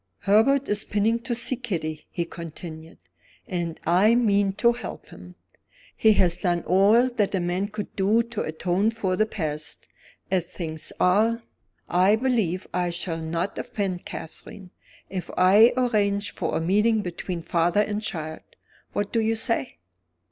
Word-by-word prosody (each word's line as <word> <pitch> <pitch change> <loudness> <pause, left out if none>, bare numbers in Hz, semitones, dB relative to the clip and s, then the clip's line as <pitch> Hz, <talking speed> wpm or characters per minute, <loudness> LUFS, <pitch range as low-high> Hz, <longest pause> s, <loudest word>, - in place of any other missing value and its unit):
"Herbert 225 +8 +3
is 205 0 0
pining 220 +3 +1
to 240 0 -3
see 245 +2 +1
Kitty," 170 -11 -4
he 170 - -3
continued; 165 -1 -9 0.5
"and 175 -5 -3
I 190 +7 +4
mean 205 -4 +2
to 235 +4 +3
help 240 - -7
him. - - -13 0.6
He 220 -1 +5
has 175 -4 +2
done 175 -3 0
all 205 +7 +4
that 210 -6 0
a - - +1
man 180 +3 -1
could 210 -1 -7
do 210 +4 +3
to 230 -2 -5
atone 175 +6 0
for 210 -5 -1
the 215 +3 +2
past. 155 -7 -5 0.5
As 180 -3 +1
things 160 -3 -6
are, 220 +5 +3 0.4
I 185 +4 +4
believe 220 -8 0
I 180 0 0
shall 170 -1 -3
not 165 +4 -3
offend 190 -4 -3
Catherine, 180 +3 -9 0.4
if 185 -2 -5
I 205 +6 +7
arrange 205 -6 +1
for - - -2
a - - -1
meeting 210 +5 +2
between 175 -1 -5
father 175 +5 +2
and 210 0 -2
child. 160 -6 -5 0.5
What 205 0 -2
do 230 - +2
you 225 0 +1
say?" 220 - -1
195 Hz, 155 wpm, -25 LUFS, 175-220 Hz, 0.6 s, I